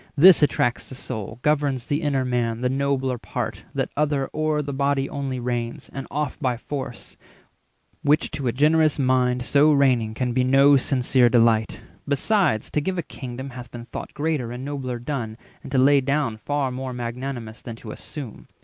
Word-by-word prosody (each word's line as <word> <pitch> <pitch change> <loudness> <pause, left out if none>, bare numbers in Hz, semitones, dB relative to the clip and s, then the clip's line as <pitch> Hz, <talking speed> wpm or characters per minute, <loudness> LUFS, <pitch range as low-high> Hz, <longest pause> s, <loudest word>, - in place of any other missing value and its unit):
This 175 +3 +8
attracts 125 -4 +1
the 130 - -8
soul, 110 -3 -6
Governs 145 -4 +1
the 145 +2 -1
inner 140 -4 0
man, 120 -2 -1
the 125 - +1
nobler 135 -2 0
part; - - -5
That - - -1
other 145 -2 0
o'er 155 -1 0
the 140 0 -4
body 140 0 +1
only 135 -2 -4
reigns, 120 -1 -3
And 135 -1 -6
oft 150 -1 -3
by 125 -4 0
force—which 140 +3 -5
to 145 -3 -3
a - - +2
generous 155 +3 +3
mind 125 -2 +2
So 145 +4 +4
reigning 125 -6 +2
can 125 0 -1
be 130 +1 +2
no 135 +2 +6
sincere 130 -2 +3
delight. 115 -2 +3 0.3
480 - - -7
Besides, 145 - +1
to 150 - +1
give 185 +4 -2
a 170 - -1
kingdom 130 0 -7
hath 125 -1 -9
been 120 -1 -9
thought - - -8
Greater 145 -6 -1
and 125 +2 -6
nobler 135 -4 -3
done, 120 -3 -4 0.2
and - - -10
to 135 - +1
lay 140 +2 +5
down 135 -4 0
Far 140 +3 -1
more 130 0 -5
magnanimous, 120 -1 -5
than 115 - -7
to 115 -1 -9
assume. 135 -3 -8
130 Hz, 180 wpm, -24 LUFS, 120-145 Hz, 0.3 s, This